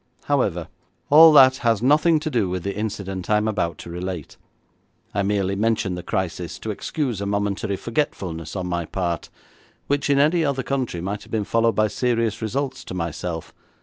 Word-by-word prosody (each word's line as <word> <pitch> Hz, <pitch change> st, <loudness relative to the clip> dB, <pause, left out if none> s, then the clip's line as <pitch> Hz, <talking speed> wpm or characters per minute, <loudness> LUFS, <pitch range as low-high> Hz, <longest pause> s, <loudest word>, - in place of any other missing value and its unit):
However, -, -, 0 dB, 0.4 s
all 160 Hz, +2 st, +10 dB
that 130 Hz, -2 st, +7 dB
has 115 Hz, -4 st, +1 dB
nothing 155 Hz, +4 st, +4 dB
to 155 Hz, -1 st, -3 dB
do 110 Hz, -8 st, +1 dB
with 90 Hz, -1 st, -3 dB
the 100 Hz, -, -3 dB
incident 100 Hz, -3 st, -4 dB
I 105 Hz, -, +4 dB
am 105 Hz, +1 st, 0 dB
about 90 Hz, -7 st, -1 dB
to -, -, -10 dB
relate. 90 Hz, -2 st, -5 dB, 0.8 s
I 100 Hz, -, +1 dB
merely 100 Hz, -1 st, 0 dB
mention 110 Hz, -2 st, 0 dB
the 90 Hz, -, -4 dB
crisis 90 Hz, -1 st, -3 dB
to 110 Hz, -, -4 dB
excuse 120 Hz, 0 st, -3 dB
a 100 Hz, -, -2 dB
momentary 100 Hz, +1 st, -1 dB
forgetfulness 95 Hz, -, -3 dB
on 90 Hz, -2 st, -2 dB
my 85 Hz, -1 st, -2 dB
part 85 Hz, -3 st, -3 dB, 0.6 s
which 145 Hz, +1 st, 0 dB
in 140 Hz, -, +4 dB
any 155 Hz, +4 st, +3 dB
other 140 Hz, -3 st, 0 dB
country 125 Hz, -9 st, -2 dB
might 100 Hz, +3 st, -3 dB
have -, -, -15 dB
been 110 Hz, -2 st, 0 dB
followed 115 Hz, +1 st, +2 dB
by 110 Hz, 0 st, +3 dB
serious 115 Hz, 0 st, 0 dB
results 130 Hz, +5 st, -2 dB
to -, -, -6 dB
myself. 85 Hz, -1 st, -4 dB
105 Hz, 180 wpm, -23 LUFS, 90-130 Hz, 0.8 s, all